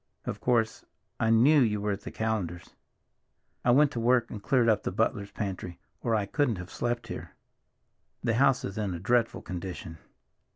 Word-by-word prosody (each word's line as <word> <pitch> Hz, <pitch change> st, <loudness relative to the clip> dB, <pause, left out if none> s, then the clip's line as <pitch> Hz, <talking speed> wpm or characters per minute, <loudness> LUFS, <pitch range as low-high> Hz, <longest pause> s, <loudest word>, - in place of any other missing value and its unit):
Of -, -, -4 dB
course, 115 Hz, -3 st, +1 dB, 0.4 s
I 115 Hz, -, +2 dB
knew 130 Hz, +7 st, +6 dB
you 105 Hz, -4 st, +2 dB
were 105 Hz, +1 st, -1 dB
at 100 Hz, 0 st, -3 dB
the -, -, -7 dB
Callenders'. 100 Hz, -6 st, -3 dB, 0.9 s
I -, -, +2 dB
went 140 Hz, +4 st, +5 dB
to 120 Hz, -, -3 dB
work 120 Hz, 0 st, +2 dB
and 105 Hz, -, -6 dB
cleared 125 Hz, +1 st, +2 dB
up 110 Hz, -2 st, +3 dB
the -, -, -3 dB
butler's 105 Hz, 0 st, 0 dB
pantry, 95 Hz, -4 st, -5 dB, 0.2 s
or 115 Hz, -2 st, +1 dB
I 105 Hz, -2 st, +1 dB
couldn't 125 Hz, +2 st, +1 dB
have 90 Hz, 0 st, -8 dB
slept 120 Hz, -1 st, -2 dB
here! -, -, -7 dB, 0.9 s
The 120 Hz, -1 st, +1 dB
house 135 Hz, +2 st, +3 dB
is 100 Hz, +3 st, -5 dB
in 100 Hz, -4 st, -2 dB
a -, -, -5 dB
dreadful 120 Hz, +5 st, +1 dB
condition." 90 Hz, -3 st, -6 dB
110 Hz, 180 wpm, -28 LUFS, 100-120 Hz, 0.9 s, knew